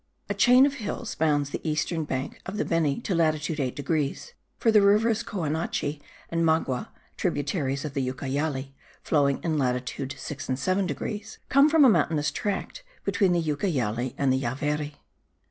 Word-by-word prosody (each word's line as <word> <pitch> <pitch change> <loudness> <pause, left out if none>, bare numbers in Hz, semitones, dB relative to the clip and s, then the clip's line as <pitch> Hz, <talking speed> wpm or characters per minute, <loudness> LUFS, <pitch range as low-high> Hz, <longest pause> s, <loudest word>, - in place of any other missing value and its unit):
A - - +1
chain 250 +2 +6
of 280 - 0
hills 230 -2 -4
bounds 145 -3 +1
the - - -4
eastern 160 +1 -1
bank 135 -1 -4
of 190 +2 -4
the - - 0
Beni 160 -5 +1
to 195 - -2
latitude 155 -2 +1
8 130 -3 -1
degrees; 150 - -2 0.2
for 225 - +3
the 215 -1 +6
rivers 215 +2 +4
Coanache 155 -4 -2 0.3
and 165 0 +1
Magua, 160 -6 +1 0.3
tributaries 140 -1 -1
of 150 - -5
the 135 -3 -1
Ucayali 135 +1 -3 0.3
(flowing 140 -3 +2
in 160 -3 0
latitude 130 +1 -2
6 140 -3 -6
and 130 - 0
7 185 +7 +1
degrees) 205 +8 -5
come 280 +2 +6
from 305 -2 +6
a - - +8
mountainous 155 -5 +2
tract 210 - -3 0.2
between 195 -4 +2
the 175 -1 +2
Ucayali 130 - -1
and 135 -2 +2
the 130 - 0
Javari. 145 +4 -2
150 Hz, 165 wpm, -26 LUFS, 140-190 Hz, 0.3 s, a